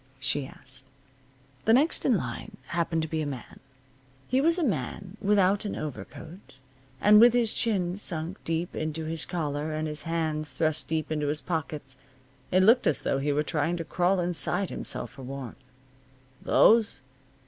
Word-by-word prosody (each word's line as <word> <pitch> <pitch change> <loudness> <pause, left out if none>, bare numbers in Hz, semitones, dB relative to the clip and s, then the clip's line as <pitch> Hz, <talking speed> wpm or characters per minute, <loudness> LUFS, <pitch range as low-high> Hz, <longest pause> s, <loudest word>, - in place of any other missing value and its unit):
she 135 +1 -1
asked. 135 0 -11 0.8
The 225 - +5
next 290 +7 +2
in 245 -6 +4
line 125 -7 -6
happened 165 -1 0
to - - -2
be 160 0 -2
a 150 - -2
man. 130 -5 -8 0.7
He 260 +2 +2
was 330 +4 +3
a 350 - 0
man 190 - -3
without 200 -1 +3
an 205 - -3
overcoat, 155 +3 -8 0.4
and 210 +7 +7
with 240 0 +8
his 235 -3 +2
chin 185 -5 0
sunk 170 -2 -3
deep 165 +1 -2
into 155 0 -3
his 160 0 -3
collar, 155 -3 -2
and 155 0 -2
his 150 0 -4
hands 155 -3 -2
thrust 155 +3 -1
deep 160 -1 -2
into 150 -2 -1
his 150 +1 -1
pockets. 150 -5 -4 0.5
It 185 +1 +4
looked 230 +5 +5
as 150 - +1
though 135 - 0
he 145 +2 0
were 150 +1 +1
trying 160 +2 -1
to 165 - -4
crawl 180 +3 +1
inside 175 +2 +1
himself - - -3
for - - -12
warmth. 130 -1 -7 0.8
"Those? 225 -10 +4
160 Hz, 170 wpm, -27 LUFS, 150-195 Hz, 0.8 s, with